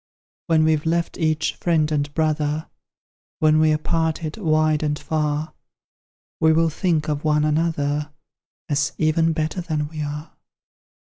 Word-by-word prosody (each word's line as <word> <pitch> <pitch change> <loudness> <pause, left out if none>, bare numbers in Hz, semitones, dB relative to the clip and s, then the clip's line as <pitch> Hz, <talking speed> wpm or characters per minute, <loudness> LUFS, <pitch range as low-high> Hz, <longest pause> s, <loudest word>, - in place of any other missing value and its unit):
When 160 -2 +4
we've 155 0 +1
left 170 +1 -1
each 155 -1 +1
friend 160 -3 +1
and 145 -1 -1
brother, 155 -1 -1 0.7
When 155 0 +4
we're 155 -1 +4
parted 160 0 -1
wide 155 -5 +2
and 150 -1 -1
far, 150 0 -2 0.9
We 160 -1 +4
will 165 +1 +3
think 160 -2 0
of 150 -1 -2
one 150 -1 +2
another, 150 -2 0 0.6
As 145 -2 0
even 160 +1 +2
better 160 +3 -2
than 155 -3 -2
we 155 -1 -6
are. 150 +1 -5
155 Hz, 135 wpm, -22 LUFS, 150-160 Hz, 0.9 s, When